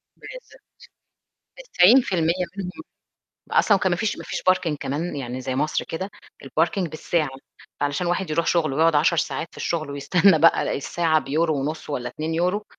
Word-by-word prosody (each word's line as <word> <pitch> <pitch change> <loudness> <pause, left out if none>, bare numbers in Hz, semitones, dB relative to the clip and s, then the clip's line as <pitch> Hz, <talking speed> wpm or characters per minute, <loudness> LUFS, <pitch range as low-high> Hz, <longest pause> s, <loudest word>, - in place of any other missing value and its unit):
بالضبط. - - -12 1.1
90% 180 -4 +4
منهم 190 - -6 0.8
أصلًا 205 - +4
وكان 190 -1 0
ما - - +1
فيش 220 +3 -1
ما - - -8
فيش - - -4
parking 170 -4 0
كمان 145 +5 -3
يعني 130 -2 -5
زَي 130 0 -3
مصر 150 +3 -1
كده، 190 +5 -5 0.3
الparking 165 +5 0
بالساعة، 155 0 -1 0.5
فعلشان 145 +5 -1
الواحد 175 0 -1
يروح 165 +2 0
شُغله 155 -6 +1
ويقعُد 165 +1 +3
10 155 +3 +3
ساعات 165 - -2
في - - -18
الشُغل 155 -4 -3
ويستنّى 160 +5 +3
بقى 165 +2 +4
الساعة 160 +3 +1
بيورو 155 +3 0
ونُص 155 +2 -4
والّا 120 -4 -3
2€ 170 - -2
165 Hz, 155 wpm, -23 LUFS, 150-180 Hz, 1.1 s, 90